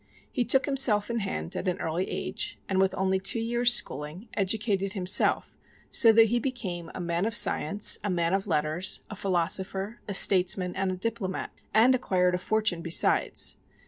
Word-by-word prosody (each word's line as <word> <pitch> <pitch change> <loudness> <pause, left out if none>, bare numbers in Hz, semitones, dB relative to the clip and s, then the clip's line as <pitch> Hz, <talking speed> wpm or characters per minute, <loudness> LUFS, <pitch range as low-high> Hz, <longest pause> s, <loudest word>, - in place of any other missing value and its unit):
He 250 - -1
took 265 +4 +3
himself 245 -7 +2
in 235 - -2
hand 80 - -5
at - - -5
an 180 - -2
early 165 +3 -3
age, - - -5
and 190 -1 -1
with 190 0 +1
only 190 0 -1
two 195 +4 -2
years 240 +2 +2
schooling, 160 - -1
educated 200 -1 -2
himself 190 -2 +1 0.4
so 230 - +5
that 225 0 +5
he 240 +2 0
became 190 -10 -5
a - - -6
man 170 +3 -2
of 225 - -3
science, 200 -1 +4
a 205 - -3
man 170 -1 -1
of 195 0 -2
letters, 155 +5 0
a - - -6
philosopher, 190 +3 -2
a 200 - -3
statesman 180 -1 +3
and 190 0 -2
a 185 - -5
diplomat, 195 -2 -4 0.2
and 230 +5 +4
acquired 180 -8 0
a 180 - -2
fortune 210 -3 -1
besides. 170 0 +1
195 Hz, 175 wpm, -26 LUFS, 180-220 Hz, 0.4 s, so